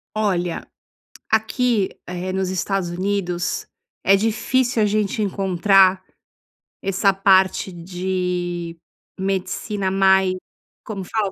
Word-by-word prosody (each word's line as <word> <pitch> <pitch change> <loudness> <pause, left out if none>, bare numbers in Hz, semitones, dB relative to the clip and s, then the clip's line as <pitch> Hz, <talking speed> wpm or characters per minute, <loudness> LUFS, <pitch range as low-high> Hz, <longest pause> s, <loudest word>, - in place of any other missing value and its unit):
Olha, 180 -5 -1 0.6
aqui, 220 -1 +1 0.2
eh, 180 +1 -4
nos 190 -1 -1
Estados 190 0 -1
Unidos, 180 -1 -2 0.3
é 195 +1 +5
difícil 235 +3 +1
a 210 - +4
gente 210 0 0
encontrar 195 -1 +3 0.8
essa 195 +1 +2
parte 190 0 +3
de 175 -1 -3 0.4
medicina 195 +1 -2
mais 190 -1 +4 0.5
como 195 -4 -5
fala 205 0 -1
190 Hz, 95 wpm, -21 LUFS, 180-200 Hz, 0.8 s, é